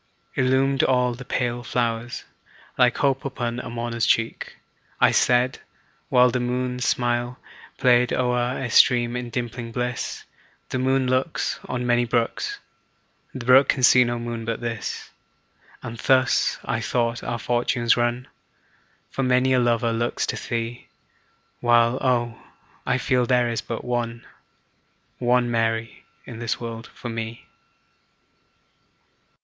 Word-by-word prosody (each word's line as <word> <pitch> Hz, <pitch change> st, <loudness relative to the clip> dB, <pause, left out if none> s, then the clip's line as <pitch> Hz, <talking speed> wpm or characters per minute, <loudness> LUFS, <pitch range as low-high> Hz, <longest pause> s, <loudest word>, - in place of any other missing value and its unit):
Illumined 135 Hz, +1 st, +2 dB
all 125 Hz, -1 st, +2 dB
the 125 Hz, +3 st, -9 dB
pale 120 Hz, -1 st, -2 dB
flowers, 120 Hz, -1 st, -2 dB, 0.5 s
Like 125 Hz, -2 st, +3 dB
hope 135 Hz, -2 st, +1 dB
upon 120 Hz, -3 st, -3 dB
a 125 Hz, -, -6 dB
mourner's 115 Hz, -1 st, -2 dB
cheek. 115 Hz, 0 st, 0 dB, 0.4 s
I -, -, +5 dB
said 125 Hz, +1 st, +2 dB, 0.5 s
(while 125 Hz, 0 st, +5 dB
The 125 Hz, -, -1 dB
moon's 125 Hz, 0 st, -2 dB
smile 120 Hz, 0 st, 0 dB, 0.4 s
Played 125 Hz, -1 st, +4 dB
o'er 125 Hz, 0 st, 0 dB
a 130 Hz, -, -3 dB
stream, 120 Hz, 0 st, +4 dB
in 125 Hz, -1 st, -4 dB
dimpling 120 Hz, 0 st, -4 dB
bliss,) 125 Hz, 0 st, -3 dB, 0.5 s
"The 130 Hz, -, -2 dB
moon 130 Hz, +1 st, +2 dB
looks 130 Hz, +5 st, -1 dB
"On 125 Hz, -1 st, -2 dB
many 120 Hz, 0 st, +2 dB
brooks, 120 Hz, -, -1 dB, 0.8 s
"The 125 Hz, -3 st, -6 dB
brook 130 Hz, +2 st, +6 dB
can 130 Hz, -, +1 dB
see 125 Hz, 0 st, +7 dB
no 120 Hz, 0 st, -2 dB
moon 120 Hz, -1 st, -5 dB
but 115 Hz, 0 st, -3 dB
this;" 115 Hz, -2 st, -5 dB, 0.7 s
And 115 Hz, 0 st, -7 dB
thus, 130 Hz, -1 st, +2 dB
I -, -, -1 dB
thought, 120 Hz, -1 st, -1 dB
our 120 Hz, 0 st, -2 dB
fortunes 120 Hz, 0 st, +1 dB
run, 120 Hz, +1 st, -1 dB, 0.8 s
For -, -, -3 dB
many 130 Hz, 0 st, +3 dB
a 130 Hz, -, +4 dB
lover 120 Hz, -1 st, +1 dB
looks 120 Hz, +1 st, -1 dB
to -, -, -5 dB
thee, 115 Hz, +1 st, -3 dB, 0.7 s
While 120 Hz, +1 st, +3 dB
oh! 120 Hz, -3 st, 0 dB, 0.5 s
I 125 Hz, -, +2 dB
feel 125 Hz, -2 st, +1 dB
there 125 Hz, -2 st, +3 dB
is 115 Hz, -, -2 dB
but 115 Hz, -, -6 dB
one, 120 Hz, -1 st, -3 dB, 0.9 s
One 120 Hz, 0 st, +2 dB
Mary 115 Hz, -1 st, -1 dB, 0.2 s
in 115 Hz, -2 st, -9 dB
the 115 Hz, -1 st, -1 dB
world 115 Hz, -1 st, -6 dB
for 120 Hz, -, -8 dB
me. 115 Hz, 0 st, -5 dB
120 Hz, 135 wpm, -23 LUFS, 120-125 Hz, 0.9 s, see